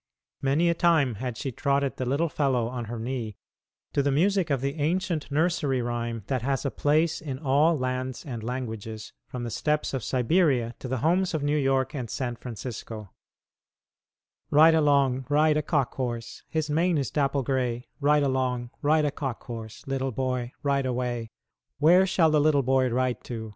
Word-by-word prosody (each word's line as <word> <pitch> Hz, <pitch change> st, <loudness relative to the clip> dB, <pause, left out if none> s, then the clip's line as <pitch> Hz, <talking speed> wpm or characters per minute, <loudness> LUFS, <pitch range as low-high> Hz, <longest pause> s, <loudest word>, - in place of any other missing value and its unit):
Many 140 Hz, +5 st, +2 dB
a 170 Hz, -, +4 dB
time 160 Hz, -8 st, +3 dB, 0.2 s
she 135 Hz, -, -4 dB
had 120 Hz, -, -11 dB
trotted 140 Hz, -1 st, 0 dB
the 130 Hz, -, -2 dB
little 145 Hz, +6 st, +1 dB
fellow 135 Hz, -6 st, 0 dB
on 120 Hz, -1 st, -4 dB
her 115 Hz, +2 st, -5 dB
knee 115 Hz, -2 st, -4 dB, 0.6 s
to 140 Hz, -, +2 dB
the 140 Hz, -, +1 dB
music 185 Hz, +4 st, +2 dB
of 140 Hz, -2 st, +1 dB
the 140 Hz, +4 st, -3 dB
ancient 170 Hz, 0 st, -1 dB
nursery 150 Hz, -3 st, +1 dB
rhyme 120 Hz, -2 st, -3 dB
that 130 Hz, 0 st, -1 dB
has 135 Hz, +3 st, -1 dB
a 140 Hz, -, 0 dB
place 155 Hz, +2 st, +1 dB
in 140 Hz, -5 st, -5 dB
all 150 Hz, +3 st, +3 dB
lands 130 Hz, 0 st, -3 dB
and 120 Hz, -6 st, -5 dB
languages, 110 Hz, -3 st, -5 dB
from 125 Hz, -1 st, -6 dB
the 120 Hz, -, -4 dB
steppes 150 Hz, +7 st, -1 dB
of 130 Hz, -4 st, -2 dB
Siberia 130 Hz, -, +2 dB
to -, -, -6 dB
the 130 Hz, +1 st, -1 dB
homes 180 Hz, +1 st, +2 dB
of 150 Hz, -, -2 dB
New 145 Hz, +1 st, +1 dB
York 135 Hz, -2 st, +1 dB
and 125 Hz, -6 st, -4 dB
San 120 Hz, 0 st, -3 dB
Francisco: 110 Hz, -4 st, -7 dB, 1.4 s
"Ride 160 Hz, +3 st, +7 dB
along, 140 Hz, -4 st, +2 dB
ride 150 Hz, +1 st, +4 dB
a 150 Hz, -, +2 dB
cock 140 Hz, -4 st, 0 dB
horse, 120 Hz, -3 st, -4 dB
His 155 Hz, -1 st, -1 dB
mane 165 Hz, +3 st, +2 dB
is 135 Hz, -6 st, -2 dB
dapple 140 Hz, -2 st, +1 dB
gray; 125 Hz, -2 st, -1 dB
Ride 150 Hz, 0 st, +3 dB
along, 130 Hz, -3 st, -1 dB
ride 155 Hz, +1 st, +3 dB
a 145 Hz, -, +1 dB
cock 135 Hz, -4 st, -5 dB
horse, 115 Hz, -3 st, -8 dB
Little 135 Hz, -1 st, -2 dB
boy, 125 Hz, 0 st, -2 dB
ride 140 Hz, -2 st, +1 dB
away. 120 Hz, -2 st, -2 dB, 0.5 s
Where 175 Hz, +6 st, +5 dB
shall 165 Hz, -4 st, +3 dB
the 150 Hz, -1 st, +4 dB
little 145 Hz, -2 st, +3 dB
boy 130 Hz, 0 st, +2 dB
ride 125 Hz, +1 st, -1 dB
to? 110 Hz, -2 st, -5 dB
135 Hz, 180 wpm, -26 LUFS, 125-150 Hz, 1.4 s, Ride